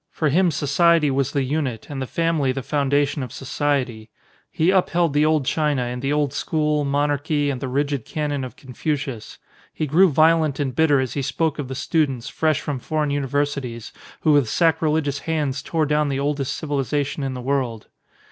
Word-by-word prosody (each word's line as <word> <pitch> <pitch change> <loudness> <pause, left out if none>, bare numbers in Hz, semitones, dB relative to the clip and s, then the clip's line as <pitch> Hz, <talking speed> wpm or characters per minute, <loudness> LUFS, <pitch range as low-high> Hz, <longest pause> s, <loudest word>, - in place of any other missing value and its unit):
For 155 - 0
him 180 +5 +3
society 155 +1 +3
was 135 -1 0
the 140 - 0
unit, 130 -4 -2
and 140 -2 -5
the 130 - -3
family 165 -4 0
the 130 0 -4
foun 140 0 -1
dation 145 0 +1
of 125 - -7
society. 130 -4 -2 0.4
He 165 +4 +2
upheld 175 -4 +2
the 150 +1 +3
old 155 -3 +2
China 150 -3 +1
and 125 0 -4
the 135 +1 -1
old 145 -2 +1
school, 150 -1 0
monarchy, 145 +1 0
and 130 -2 -5
the 135 - -2
rigid 140 0 -1
canon 145 -3 -3
of 130 - -6
152 - - -41
THE - - -22
PnilOSOPHEE 140 +4 -2
Confucius. 120 -6 -8 0.4
He 155 - -1
grew 175 +6 +5
violent 155 -1 +3
and 135 -3 -1
bitter 150 -2 +4
as 130 -2 -2
he 140 - -2
spoke 150 +3 -1
of 140 - -3
the 130 - -5
students, 140 -4 0
fresh 155 -3 0
from 140 -3 -3
foreign 150 +2 -1
universi 145 +1 0
ties, 115 -3 -7 0.3
who 155 - +3
with 140 -6 +3
sacrilegious 160 -3 +1
hands 145 -4 -2
tore 160 +1 0
down 150 0 +1
the 135 -1 -1
oldest 140 -1 -1
civilisation 145 0 -2
in 135 -1 -3
the - - -5
world. 125 -4 -2
145 Hz, 200 wpm, -22 LUFS, 135-155 Hz, 0.4 s, grew